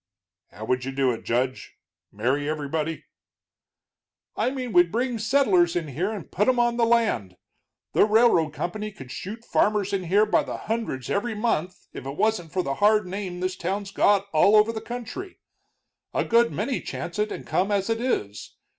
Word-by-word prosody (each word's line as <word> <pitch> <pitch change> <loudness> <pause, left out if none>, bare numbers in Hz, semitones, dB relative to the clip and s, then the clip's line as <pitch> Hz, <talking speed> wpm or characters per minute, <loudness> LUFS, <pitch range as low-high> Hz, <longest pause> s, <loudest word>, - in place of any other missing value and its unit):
"How 110 +2 -9
would 125 +2 0
you 135 - -3
do 135 -1 +1
it, 115 - -6
Judge? 125 +2 -2 0.3
marry 130 +8 -1
everybody?" 155 +1 -3 1.3
"I - - +1
mean 255 -4 -5
we'd 175 -1 +5
bring 240 +1 -1
settlers 210 -8 +3
in 165 -4 -2
here 175 +10 -2
and 205 -7 -7
put 210 - +1
'em 255 -1 +3
on 240 0 +2
the 230 -1 +3
land. 210 - +1 0.6
The - - +5
railroad 215 -7 +4
company 210 +7 -4
could 135 -10 -11
shoot 220 - -7
farmers 205 -1 +1
in 190 -2 -1
here 200 +5 +4
by 210 - +3
the - - -5
hundreds 220 - -3
every 220 +3 -1
month 190 -5 -2
if - - -7
it 140 +2 -6
wasn't 210 -6 0
for 185 - 0
the 135 - -2
hard 210 0 +4
name 180 -1 -5
this 185 0 -1
town's 195 +3 -3
got 200 0 +3
all 195 +7 +5
over 215 +1 +5
the 220 - -5
country. 245 - -7 0.8
A - - +1
good 235 0 +3
many 210 - -2
chance 175 +3 -6
it 210 0 0
and - - -6
come 195 +3 0
as 200 -1 +1
it 225 0 -1
is. 105 - -3
200 Hz, 185 wpm, -25 LUFS, 155-225 Hz, 1.3 s, we'd